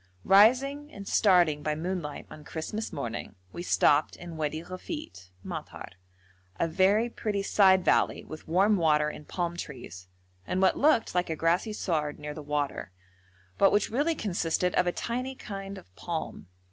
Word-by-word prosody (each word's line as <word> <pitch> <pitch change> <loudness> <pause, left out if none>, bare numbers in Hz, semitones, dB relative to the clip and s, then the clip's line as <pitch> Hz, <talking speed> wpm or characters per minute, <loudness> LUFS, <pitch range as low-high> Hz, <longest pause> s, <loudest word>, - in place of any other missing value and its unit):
Rising 270 +9 +4
and 200 -1 -9
starting 175 -7 +4
by 150 +1 -1
moonlight 165 -2 -4
on 150 - -10
Christmas 190 +9 -5
morning, 120 -4 -5 0.2
we - - -5
stopped 150 -3 +3
in 175 -2 -9
Wadi 155 +1 -3
Ghafit 185 - -8
(madhar), - - -7 0.7
a 170 - +2
very 195 +7 +3
pretty 210 -4 -3
side 190 -2 +4
valley, - - +2
with 155 - -10
warm 195 +5 +3
water 150 -3 +3
and 150 0 -10
palm 175 -1 -2
trees, 120 - -8 0.4
and 185 - -1
what 190 -1 +4
looked 295 -6 +3
like 180 -1 0
a 160 - -1
grassy 170 +7 +1
sward 155 -7 -2
near 150 0 -6
the 155 - -8
water, 145 -8 -3 0.7
but 195 - +6
which 205 +1 +1
really 295 +7 +1
consisted 180 - -1
of 180 - +2
a - - +3
tiny 250 +7 -3
kind 195 -3 -7
of 95 - -15
palm. 165 - -5
175 Hz, 160 wpm, -28 LUFS, 155-205 Hz, 0.7 s, but